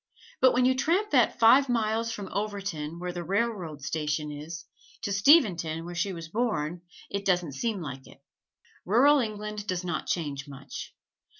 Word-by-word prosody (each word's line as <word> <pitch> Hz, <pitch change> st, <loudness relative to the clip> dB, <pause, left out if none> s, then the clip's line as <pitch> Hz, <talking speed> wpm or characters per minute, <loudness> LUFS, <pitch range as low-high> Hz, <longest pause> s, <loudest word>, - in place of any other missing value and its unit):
But 260 Hz, -1 st, +5 dB
when 250 Hz, 0 st, +3 dB
you 260 Hz, -, +5 dB
tramp 345 Hz, +11 st, +1 dB
that 250 Hz, -5 st, +3 dB
five 255 Hz, +4 st, +6 dB
miles 230 Hz, -1 st, 0 dB
from 205 Hz, -3 st, -5 dB
Overton, 200 Hz, -7 st, -3 dB
where 180 Hz, +1 st, -4 dB
the 175 Hz, -1 st, -4 dB
railroad 190 Hz, -7 st, -2 dB
station 150 Hz, 0 st, -2 dB
is, 160 Hz, +3 st, -7 dB, 0.4 s
to 200 Hz, -, -2 dB
Steventon, 190 Hz, -, +4 dB
where 175 Hz, -, -6 dB
she 175 Hz, +3 st, -1 dB
was 165 Hz, -3 st, -7 dB
born, 175 Hz, -5 st, -1 dB, 0.3 s
it 200 Hz, 0 st, -2 dB
doesn't 180 Hz, -5 st, +1 dB
seem 200 Hz, -, -2 dB
like 135 Hz, -2 st, -7 dB
it. -, -, -15 dB, 0.7 s
Rural 275 Hz, +9 st, +5 dB
England 210 Hz, -2 st, -4 dB
does 185 Hz, -2 st, -2 dB
not 175 Hz, -1 st, -3 dB
change 145 Hz, -5 st, -2 dB
much. 140 Hz, -1 st, -9 dB
195 Hz, 165 wpm, -28 LUFS, 160-225 Hz, 0.7 s, five